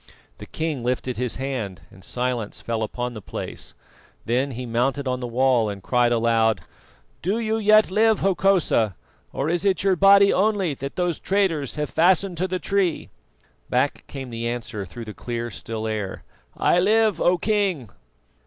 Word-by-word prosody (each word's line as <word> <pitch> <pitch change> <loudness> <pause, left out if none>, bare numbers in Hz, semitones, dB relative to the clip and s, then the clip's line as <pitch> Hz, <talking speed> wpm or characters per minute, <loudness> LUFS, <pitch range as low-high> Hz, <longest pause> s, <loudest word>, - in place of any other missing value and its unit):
The - - -9
king 155 -6 -3
lifted 125 0 -2
his 125 -1 -1
hand, 125 -8 -4
and 95 - -16
silence 120 0 -3
fell 115 -1 -3
upon 120 +3 -3
the 110 - -8
place; - - -6 0.5
then 125 +4 +1
he 125 -1 -6
mounted 130 +4 0
on 125 0 -1
the 125 - -4
wall 120 -2 +2
and 100 -2 -7
cried 120 +1 +2
aloud: 115 -4 +2 0.6
"Do 195 +6 0
you 220 -1 0
yet 215 -1 +5
live, 220 +2 +3
Hokosa, 185 - +2 0.4
or 135 - -2
is 170 +1 0
it 195 -2 +1
your 195 -1 +3
body 200 +2 +6
only 195 -5 +1
that 140 +1 -6
those 175 -3 -1
traitors 185 -9 0
have 150 -1 -3
fastened 180 +2 +2
to 185 +3 0
the 185 0 -2
tree?" 190 -3 -1 0.6
Back - - 0
came 135 -3 -7
the 115 0 -3
answer 115 -4 -4
through 115 +6 -9
the 105 - -7
clear 120 0 -5
still 110 +3 -6
air: 105 -3 -4 0.3
"I 175 - +3
live, 215 +3 +3
O 180 +1 +4
King!" 190 - 0
135 Hz, 170 wpm, -23 LUFS, 115-190 Hz, 0.6 s, body